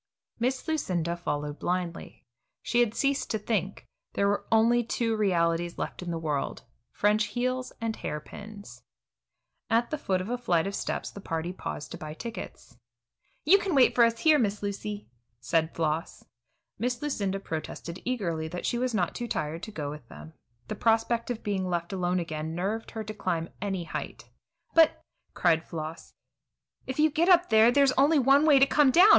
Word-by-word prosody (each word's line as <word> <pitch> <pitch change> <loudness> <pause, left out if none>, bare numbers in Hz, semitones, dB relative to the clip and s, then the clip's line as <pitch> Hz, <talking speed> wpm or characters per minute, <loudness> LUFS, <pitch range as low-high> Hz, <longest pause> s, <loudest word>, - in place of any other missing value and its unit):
Miss 255 +5 -1
Lucinda 180 - -1
followed 150 -3 -3
blindly. 180 -1 -3 0.4
She 240 - +1
had 235 -2 +2
ceased 280 0 0
to 220 - 0
think; 205 -2 -2 0.3
there 200 - +2
were 205 0 0
only 230 +2 +4
two 230 0 -1
realities 175 -4 +1
left - - -4
in 180 - -5
the 170 - -2
world, 150 -4 -2 0.3
French 210 +1 +2
heels 255 +4 -2
and 225 -1 -2
hair 150 - -4
pins. 205 +6 -11 0.9
At 230 +1 +2
the 305 - -2
foot 190 -8 0
of 185 - -4
a 245 +1 -2
flight 170 -9 +1
of 195 - -3
steps - - -3
the 200 - -10
party 165 0 -3
paused 150 -5 -6
to - - -7
buy 155 0 -7
tickets. 230 +6 -8 0.7
"You 385 +7 +7
can 385 -5 -1
wait 260 -2 +6
for 240 - +5
us 230 0 +2
here, 310 -2 +5
Miss 205 -3 0
Lucy," 205 +1 -4 0.3
said 160 +5 0
Floss. 160 0 -2 0.5
Miss 245 +2 -1
Lucinda 200 -10 -2
protested 170 0 -6
eagerly 175 -11 -2
that 175 +2 -5
she 240 - 0
was 250 -2 0
not 180 -4 0
too 240 - -4
tired 155 -5 -3
to 215 - -7
go 150 -7 -4
with 150 -5 -10
them. 75 +2 -11 0.3
The - - -3
prospect 230 +1 +1
of 240 -2 -4
being 190 -3 -1
left 170 +1 -2
alone 180 -1 0
again 160 -1 -4
nerved 205 +6 -2
her 220 -1 -5
to 215 0 -6
climb 175 -5 -2
to - - -17
any 195 -3 -2
height. 120 -7 -7 0.4
"But," 325 -1 +5 0.3
cried 165 -2 +3
Floss, 160 0 -7 0.7
"if 260 - -4
you 310 0 +4
get 330 +5 +2
up 355 -1 +6
there, 220 +2 +7
there's 275 +1 +4
only 285 +4 +4
one 275 +3 +5
way 290 -3 +7
to 270 - +7
come 290 0 +4
down. 355 +9 +7
205 Hz, 185 wpm, -28 LUFS, 170-245 Hz, 0.9 s, You